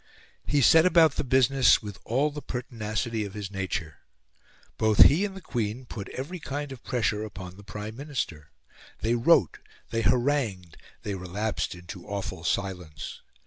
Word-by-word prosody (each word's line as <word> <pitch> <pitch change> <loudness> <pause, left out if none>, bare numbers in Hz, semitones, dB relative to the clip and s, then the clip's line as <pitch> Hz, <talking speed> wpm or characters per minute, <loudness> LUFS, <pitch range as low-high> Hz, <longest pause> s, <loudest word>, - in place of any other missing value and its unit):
He 145 -1 +3
set 160 +7 +7
about 165 -3 +6
the - - 0
business 130 -3 +4
with 105 -2 -7
all 140 +6 +1
the 150 0 -6
pertinacity 115 -3 -3
of 100 0 -7
his 100 -2 -5
nature. 95 -5 -3 0.8
Both 110 -1 +7
he 170 +8 +5
and 195 -1 -6
the - - -9
Queen 120 -3 -3
put 105 -4 -7
every 160 +8 -5
kind 145 -1 -4
of 130 -3 -9
pressure 110 -4 0
upon 95 -4 -8
the 105 - -13
Prime 105 +2 -7
Minister. 130 - -4 0.5
They 115 +2 +1
wrote, 120 - +4 0.3
they 115 - 0
harangued, 120 - +1 0.3
they 105 - -3
relapsed 95 +3 -3
into 90 +1 -10
awful 100 -5 -4
silence. 90 -4 -3
110 Hz, 155 wpm, -27 LUFS, 100-135 Hz, 0.8 s, set